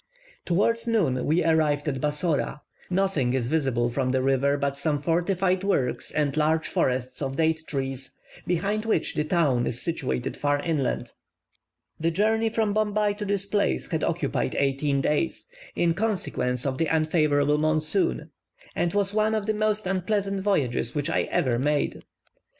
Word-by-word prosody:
Towards 230 +7 +1
noon 165 - +1
we 160 +4 +2
arrived 155 -2 +2
at 135 -3 -2
Bassora. 150 0 -1 0.3
Nothing 180 -9 +1
is 125 -3 0
visible 135 -6 +1
from 130 +1 -1
the 130 0 +1
river 135 +1 +2
but 140 -1 -1
some 145 +1 -1
fortified 180 +4 +1
works 140 -11 0
and 145 -2 0
large 155 +1 +1
forests 130 +1 -1
of 135 -1 -2
date 160 +1 +1
trees, 135 -2 -3 0.4
behind 200 +5 0
which 225 -8 0
the 150 - 0
town 150 -7 +1
is 120 - -3
situated 65 - -2
far 145 0 0
inland. 150 -6 -1 0.9
The 165 +1 +1
journey 220 +6 +1
from 220 -2 0
Bombay 210 -1 +1
to 210 - -3
this 200 -1 -1
place 200 - 0
had - - -1
occupied 60 - -1
eighteen 140 0 +1
days, 150 - 0 0.3
in 170 -1 +2
consequence 170 - -1
of 130 -1 -2
the 165 - +2
unfavourable 150 -2 +2
monsoon, 155 - +1 0.4
and 175 +2 0
was 200 0 +1
one 215 +1 +2
of 215 -2 -1
the 215 - +1
most 215 0 0
unpleasant 195 +1 -1
voyages 145 - 0
which 145 -1 -1
I - - +1
ever 120 -3 +1
made. 145 +2 0
155 Hz, 155 wpm, -26 LUFS, 140-195 Hz, 0.9 s, we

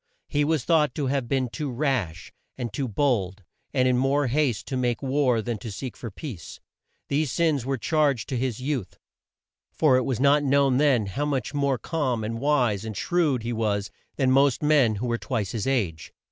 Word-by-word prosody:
He 145 - +1
was 155 -3 0
thought 150 -5 +2
to 145 - -1
have 135 -2 -1
been 130 0 0
too 145 +4 -4
rash, 120 - -2 0.2
and 120 -4 -4
too 135 +3 -2
bold, 105 -6 0 0.3
and 130 -1 +2
in 125 -1 +2
more 140 +2 +2
haste 130 -3 0
to 135 - -2
make 125 0 -1
war 130 -4 +1
than 120 -2 -3
to 115 -3 -7
seek 125 +5 -6
for 115 - -7
peace. 105 - -8 0.5
These 145 -1 0
sins 150 -6 +1
were 135 -1 0
charged 145 -3 +1
to 130 - -2
his 125 -3 -2
youth, 130 -6 -3 0.7
for 145 -5 +3
it 130 - +1
was 130 -2 -2
not 140 +2 +4
known 140 -2 +3
then 135 -7 +3
how 135 +10 -2
much 140 -2 -2
more 140 -2 +1
calm, 130 -7 -2
and 115 +1 -3
wise, 125 -8 +1
and 110 -2 -6
shrewd 155 -9 +1
he 120 +1 -2
was 105 -3 -1 0.2
than 130 -2 +2
most 135 +1 +3
men 145 -7 +4
who 105 +5 -3
were 120 -1 -1
twice 110 -7 -2
his 115 +1 -3
age. 95 - -1
130 Hz, 200 wpm, -25 LUFS, 115-145 Hz, 0.7 s, not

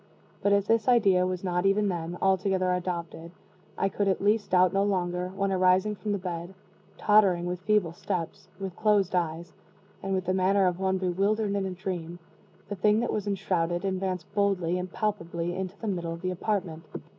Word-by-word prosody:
But 200 - +2
if 200 -1 +3
this 225 +2 +2
idea 195 -7 +4
was 185 0 -3
not, 180 -1 0
even 205 +1 +2
then, 175 -2 -3
altogether 190 -1 +2
adopted, 170 -2 -4 0.5
I 195 - +1
could 200 +1 -1
at 190 - +1
least 205 +1 +1
doubt 185 0 +4
no 195 - +2
longer, 180 -2 -1
when, 195 0 0
arising 185 +2 +3
from 210 +1 -4
the 200 - +1
bed, 180 0 -6 0.4
tottering, 195 -5 +4
with 180 0 -3
feeble 190 -3 +1
steps, 175 +1 -4
with 190 -2 -5
closed 205 -4 +2
eyes, 170 -1 -2 0.5
and 195 0 -1
with 185 -1 -2
the 185 - +1
manner 190 +1 +3
of 180 0 0
one 190 0 +1
bewildered 200 +3 0
in 200 -1 -1
a - - -3
dream, 180 -2 -5 0.5
the 205 - -4
thing 210 +3 +3
that 240 - -1
was 210 -1 -2
enshrouded 185 -3 -1
advanced 185 -2 -2
boldly 185 -4 +1
and 180 0 -5
palpably 175 -5 -2
into 190 +1 -5
the 225 - -5
middle 170 -4 -2
of 165 +2 -10
the 185 - 0
apartment. 180 -3 -2
185 Hz, 190 wpm, -27 LUFS, 175-200 Hz, 0.5 s, idea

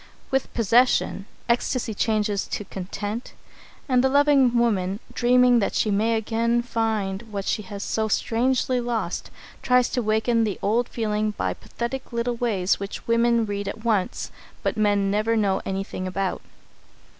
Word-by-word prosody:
With 270 0 0
possession, 230 -3 +2 0.2
ecstasy 235 -1 0
changes 210 -1 0
to - - -4
content, 205 +5 -5 0.5
and 255 -2 +3
the 265 - +4
loving 275 -3 +4
woman, 200 -5 +1
dreaming 250 0 +4
that 200 - -1
she 215 - +1
may 220 +3 +2
again 230 +2 0
find 220 -5 -1
what 200 -2 -4
she - - 0
has 200 0 -7
so 220 0 -1
strangely 250 +4 +1
lost, 230 -7 -3 0.3
tries 250 -1 +3
to 250 - -1
waken 220 +1 +2
the 210 -3 -1
old 230 +4 +1
feeling 215 -2 -1
by - - -1
pathetic 255 +3 -6
little 235 +1 -1
ways 210 -6 0
which 200 0 -6
women 230 0 +3
read 205 -1 -4
at 215 +3 -6
once, 210 -5 0 0.3
but - - 0
men 205 -2 +2
never 215 +2 +1
know 200 -3 +1
anything 195 -1 -3
about. 190 0 -2
225 Hz, 150 wpm, -24 LUFS, 205-240 Hz, 0.5 s, the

